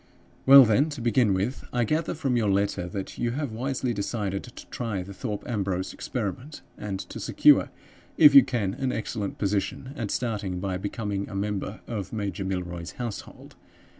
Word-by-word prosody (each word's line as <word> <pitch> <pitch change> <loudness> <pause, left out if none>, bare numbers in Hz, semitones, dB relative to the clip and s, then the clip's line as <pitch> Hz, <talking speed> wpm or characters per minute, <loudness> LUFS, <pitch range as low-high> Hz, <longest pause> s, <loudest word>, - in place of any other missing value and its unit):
"Well, 135 -1 +11
then, 125 +8 +3
to - - -6
begin 120 -2 +3
with: 100 +8 -1
I 120 -1 +1
gather 155 +8 0
from 135 -5 0
your 110 -4 +2
letter 100 -2 0
that 95 +2 -6
you 120 -1 0
have 145 -5 -2
wisely 125 +1 -2
decided 100 -2 -2
to 120 - -12
try 115 -8 -3
the 100 +2 -9
Thorpe 105 +1 -5
Ambrose 95 -5 -2
experiment, 125 - -5
and 100 -2 -4
to - - -8
secure, - - +4 0.5
if 150 -3 +8
you 140 -2 +10
can, 115 -7 -1
an 130 -1 -2
excellent 110 -3 -3
position 105 +6 -2
at 115 -7 -4
starting 105 -7 -2
by 95 -1 -2
becoming 100 0 -3
a 100 - -7
member 100 +1 -3
of 105 -5 -5
Major 100 -4 -3
Milroy's 90 -2 -4
household. 120 -4 -7
105 Hz, 170 wpm, -26 LUFS, 100-125 Hz, 0.5 s, Well